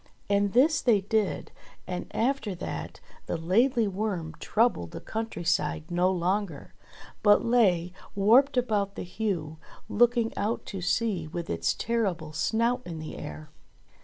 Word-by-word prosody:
And 200 0 +2
this 295 +6 +4
they 225 -6 +4
did, 210 0 -1 0.3
and 180 -1 -4
after 230 -4 -1
that 175 - -6 0.3
the - - -1
Laidly 225 +8 +2
Worm 190 -5 -3
troubled 220 - +1
the - - -7
country 225 -4 -5
side 155 0 0
no 175 +1 +3
longer; 185 -3 -2 0.5
but 205 -1 +5
lay 185 -8 +3 0.2
warped 245 +8 +5
about 210 -5 0
the - - -4
Heugh 175 -5 -3 0.3
looking 235 0 +2
out 220 +3 -2
to 195 -2 -6
sea 185 -2 0
with 170 +2 -5
its 85 0 0
terrible 190 -9 -1
snout 230 +8 +1
in 170 -2 -7
the 155 0 -7
air. 75 +1 -8
200 Hz, 140 wpm, -28 LUFS, 170-230 Hz, 0.5 s, but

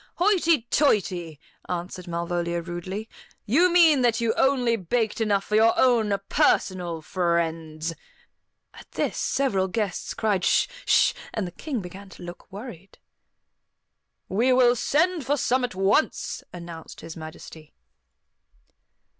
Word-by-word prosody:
"Hoity 340 - +3
toity," 180 - +1 0.3
answered 180 +1 -5
Malvolia 170 0 -2
rudely; 180 +5 -6 0.4
"you 335 - +4
mean 325 -6 +6
that 235 -2 +2
you 230 -1 +1
only 255 -4 +2
baked 220 +3 -1
enough 205 -3 +1
for 210 - -8
your 225 +1 +5
own 235 -5 +3 0.2
personal 175 -4 +1
friends." 165 -2 -1 0.8
At - - -14
this - - -1
several 200 -9 0
guests 195 -1 -3
cried, 205 -4 0
"Sh! - - +3 0.2
Sh!" - - +4 0.2
and 215 - -1
the 175 - -6
King 260 - -4
began 190 +2 -10
to 185 - -12
look 175 +3 -10
worried. 195 -3 -10 1.3
"We 235 +7 +2
will 250 -1 +5
send 320 +6 +1
for 285 +3 0
some 255 -1 +1
at 245 -6 -3
once," 195 +10 0
announced 170 -2 -9
His 165 0 -9
Majesty. 160 -1 -11
200 Hz, 130 wpm, -25 LUFS, 175-245 Hz, 1.3 s, mean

